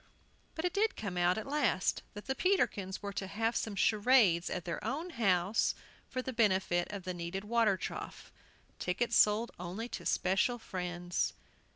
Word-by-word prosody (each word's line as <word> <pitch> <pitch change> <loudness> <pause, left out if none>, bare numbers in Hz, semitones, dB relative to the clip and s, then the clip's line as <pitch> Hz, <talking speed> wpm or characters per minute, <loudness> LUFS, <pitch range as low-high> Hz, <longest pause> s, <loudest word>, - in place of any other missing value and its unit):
But 320 - -2
it 360 - 0
did 430 +2 +1
come 200 -4 -4
out 175 +2 +2
at 220 - -3
last 275 -10 +1
that 205 - -8
the 265 - 0
Peterkins 210 - 0
were 200 0 -4
to 195 -1 -3
have 225 +4 -1
some 215 -2 -2
charades 205 -4 +4
at 180 - -4
their 170 - -4
own 320 +7 -3
house 195 - +2 0.3
for 255 - -3
the 260 - -4
benefit 190 -6 +2
of 200 -2 -6
the 185 0 -3
needed 175 +3 -4
water 215 -2 +2
trough, - - -6 0.5
tickets 180 +7 0
sold 215 +3 +4
only 185 +6 -4
to - - -5
especial 190 +6 +1
friends. 175 -4 -2
205 Hz, 170 wpm, -33 LUFS, 180-235 Hz, 0.5 s, charades